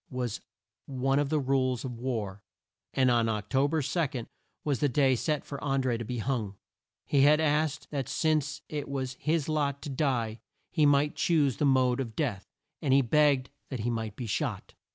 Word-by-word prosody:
was 125 -4 -3 0.5
one 135 +1 +1
of 145 -1 0
the 155 0 +2
rules 130 -2 0
of 120 -3 -6
war, 110 -6 -3 0.5
and 130 -2 +3
Oc 115 -3 +1
to 135 +1 +3
ber 155 0 0
2 140 -4 -1 0.4
was 145 -4 0
the 145 - +2
day 135 +1 +3
set 150 +4 -1
for 140 - -7
An 135 -1 +1
dré 120 -3 0
to - - -3
be 125 +2 -4
hung. 110 -4 -2 0.5
He 140 - +3
had 150 +2 +6
asked 150 -1 0
that 135 -3 -3
since 150 0 0
it 145 -2 -4
was 130 -2 -3
his 155 -1 0
lot 145 -3 0
to 145 - -5
die 125 -6 0 0.3
he 155 -3 +4
might 145 +2 +3
choose 150 -9 +2
the 150 - +1
mode 130 -2 +3
of 115 -5 -4
death; 115 -11 -2 0.3
and 135 -5 +2
begged 145 -4 +3 0.2
that 130 -5 -4
he 120 +3 0
might 110 -3 -3
be 125 - -5
shot. 110 - -3
135 Hz, 190 wpm, -29 LUFS, 120-145 Hz, 0.5 s, had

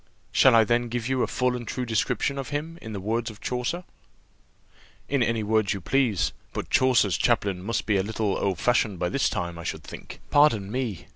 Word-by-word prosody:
"Shall 130 -3 +6
I 115 - +7
then 120 +2 +1
give 120 0 -3
you 130 -1 0
a - - +1
full 125 0 0
and 120 -2 -6
true 125 +3 -3
description 120 +4 0
of 135 - -5
him 155 +3 -4
in 110 - -7
the 100 - -4
words 115 +4 -1
of 110 -1 -12
Chaucer?" 125 +8 -2 1.2
"In 140 -2 0
any 115 -2 +1
words 110 -1 +1
you - - -4
please. 120 -1 +1 0.2
But - - -5
Chaucer's 125 -8 +3
chaplain 100 -6 +1
must 105 +3 -2
be 105 -2 +2
a - - +2
little 105 -1 -1
old 95 -3 -1
fashioned 110 -3 +1
by 90 0 -1
this 140 - +1
time, 85 -1 -4
I - - -7
should - - -4
think." - - -10
"Pardon 115 -10 +4
me. 120 -7 -3
115 Hz, 210 wpm, -26 LUFS, 100-125 Hz, 1.2 s, I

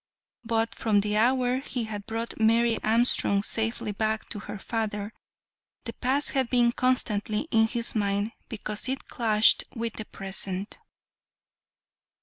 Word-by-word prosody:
But 225 -1 0
from 210 -3 +2
the 210 +1 -1
hour 250 +3 +3
he 255 -3 -3
had 210 -2 -6
brought 225 +1 -4
Mary 230 +1 +3
Armstrong 220 -3 +2
safely 225 -1 -1
back 220 +1 -1
to 210 - -4
her 210 - -7
father, 210 -1 -3 0.7
the 230 - -6
past 265 +5 0
had 265 -3 0
been 240 -2 +4
constantly 215 -4 0
in 225 0 +4
his 235 0 -1
mind 205 0 0 0.2
because 215 +1 -4
it 265 - -3
clashed 220 -3 +4
with 230 -1 -3
the 215 - -5
present. 195 0 -5
225 Hz, 135 wpm, -27 LUFS, 210-235 Hz, 0.7 s, been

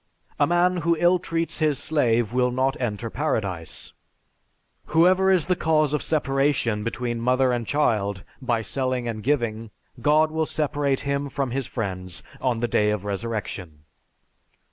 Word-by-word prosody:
A - - +4
man 175 +1 +3
who 170 0 +2
illtreats 175 -1 +1
his 155 -3 +2
slave 120 -7 +1
will 125 0 +2
not 130 +2 0
enter 115 -1 -3
paradise.... 100 - -3 0.9
Whoever 185 +4 +4
is 185 -5 +3
the 180 - +1
cause 155 -3 +2
of 150 - 0
separation 135 -7 +1
between 120 0 -3
mother 130 +1 +3
and 120 -2 -2
child 105 -9 0 0.2
by 120 -3 0
selling 130 +2 -2
and 110 -2 -4
giving, 115 -4 -1 0.3
God 155 +3 +4
will 160 0 -1
separate 145 -3 0
him 140 0 -2
from 135 -2 -2
his 135 0 -2
friends 95 -5 -4 0.2
on 120 -3 0
the 120 - +1
day 105 -2 +2
of 105 -2 -2
resurrection." 100 -7 -4
130 Hz, 145 wpm, -24 LUFS, 115-150 Hz, 0.9 s, A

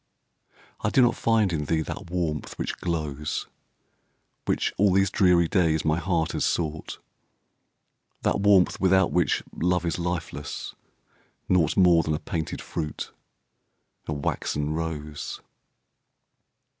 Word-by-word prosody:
I - - +2
do 130 - +4
not 120 -1 +4
find 110 -5 +2
in 75 -2 -1
thee 80 +2 +1
that 85 - -7
warmth 85 -4 -2
which - - -3
glows, 75 -4 -3 1.0
Which, - - 0
all 100 0 +4
these 95 0 +3
dreary 90 -5 +4
days, 80 -3 +2
my 80 +1 +2
heart 85 -2 0
has - - -1
sought, 80 -2 -2 1.3
That - - +1
warmth 100 -2 +4
without 95 -1 +4
which 90 -1 +1
love 90 0 +1
is 85 - -1
lifeless, 85 -4 -4 0.7
naught 85 -5 +2
More 90 -3 +6
than 80 -1 -1
a - - -3
painted 80 -1 -4
fruit, 75 -3 -4 1.0
a 75 - -1
waxen 75 +1 -2
rose. 75 -2 -4
85 Hz, 125 wpm, -26 LUFS, 75-90 Hz, 1.3 s, More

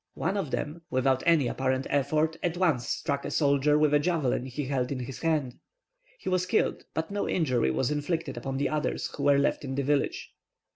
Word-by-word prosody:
One 195 - -1
of 195 -8 -2
them, 150 +5 -3
without 130 0 +2
any 165 -5 +5
apparent 130 +1 -1
effort, 155 +3 +1
at 175 -1 -1
once 155 -10 +1
struck 140 -3 -1
a - - -4
soldier 145 0 +3
with 150 -1 +3
a 145 - +5
javelin 145 -6 0
he 135 +3 -4
held 130 -1 -1
in 130 -2 -2
his 125 +1 -7
hand. 155 -6 -1 0.6
He - - -12
was 185 0 +1
killed, 215 - +1
but 160 +4 -2
no 205 0 -1
injury 130 - +1
was 120 - 0
inflicted 160 +3 -2
upon 135 -1 -4
the 140 - +1
others 155 -1 -2
who - - -6
were 140 0 +4
left 140 +1 +1
in 135 -1 -4
the 140 - 0
village. 145 +1 0
145 Hz, 205 wpm, -28 LUFS, 135-160 Hz, 0.6 s, any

